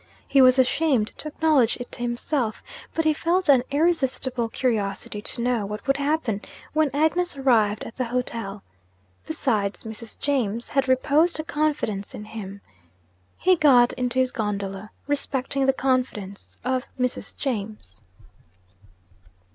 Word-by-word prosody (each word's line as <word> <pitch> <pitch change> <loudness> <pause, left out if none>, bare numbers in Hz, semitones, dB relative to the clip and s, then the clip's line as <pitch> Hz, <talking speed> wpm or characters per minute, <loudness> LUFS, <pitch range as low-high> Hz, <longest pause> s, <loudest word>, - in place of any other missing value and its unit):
He 275 - +5
was 255 0 +7
ashamed 260 -3 +2
to - - -6
acknowledge 300 -6 +2
it 245 - -8
to - - -9
himself, 240 0 -2 0.3
but 325 - +1
he 310 - +4
felt 345 +4 0
an 265 -3 +7
irresistible 265 -6 +1
curiosity 210 -4 -2
to 235 - -2
know 245 -3 +1
what 210 +2 -6
would 275 +1 +2
happen 280 -8 0 0.3
when 310 -1 +3
Agnes 315 +3 +1
arrived 220 -6 +2
at 225 - -9
the 255 - 0
hotel. 230 -4 -3 0.6
Besides, 220 -10 -1
'Mrs. 220 0 -9
James' 235 -5 -1
had 275 -1 +1
reposed 300 +6 +3
a - - -1
confidence 295 -11 -1
in 210 - -8
him. 200 -2 -8 0.8
He 370 0 +4
got 265 -7 +5
into 250 0 -2
his 255 -1 +2
gondola, 200 -1 -3 0.2
respecting 275 -1 -1
the - - +6
confidence 255 -7 -2
of 255 0 0
'Mrs. 250 0 -2
James.' 210 - -4
255 Hz, 140 wpm, -24 LUFS, 220-285 Hz, 0.8 s, was